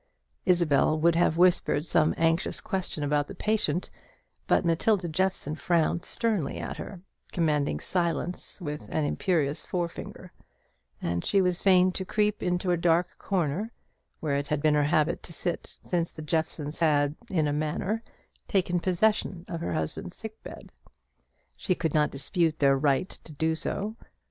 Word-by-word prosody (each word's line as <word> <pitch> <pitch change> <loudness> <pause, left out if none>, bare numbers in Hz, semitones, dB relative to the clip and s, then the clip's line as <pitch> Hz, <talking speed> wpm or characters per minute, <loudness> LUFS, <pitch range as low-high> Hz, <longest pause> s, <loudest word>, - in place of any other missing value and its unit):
Isabel 160 -4 +3
would 170 +2 +4
have 165 -1 +2
whispered 175 -4 +3
some 155 -1 +2
anxious 165 +2 +1
question 185 -6 -3
about 145 0 +1
the - - -8
patient; 195 -6 0 0.6
but - - +3
Matilda 180 +3 +2
Jeffson 175 -2 -1
frowned 170 +1 +1
sternly 215 - -1
at - - -5
her, 190 -4 -8 0.3
commanding 150 -5 +1
silence 175 +1 -1
with 150 -4 -6
an 155 - 0
imperious 155 -2 0
forefinger; 175 -2 -5 0.7
and 85 0 -1
she 200 - +3
was 180 -2 +1
fain 185 -1 +5
to 190 - -3
creep 210 +2 0
into 180 0 0
a 175 - +2
dark 170 +1 +1
corner, 185 +4 -1 0.5
where 145 -3 0
it 140 0 -2
had 150 -1 0
been 155 0 +3
her 150 -1 +3
habit 155 0 +2
to 170 - -10
sit 175 +1 -3
since 170 -2 -1
the 155 - -8
Jeffsons 155 -1 -2
had, 145 -3 +3 0.2
in 160 -6 +1
a 145 - 0
manner, 155 +9 -1 0.5
taken 180 -2 +1
possession 185 -1 +1
of 170 -2 -5
her 90 - -2
husband's 80 - -3
sick 220 0 -7
bed. - - -10 0.8
She 185 - 0
could 165 -3 -2
not 150 -1 +3
dispute 160 +3 0
their 140 -1 +4
right 140 +4 +2 0.2
to - - -11
do 160 +2 +1
so. 205 +7 -3
170 Hz, 160 wpm, -28 LUFS, 150-185 Hz, 0.8 s, fain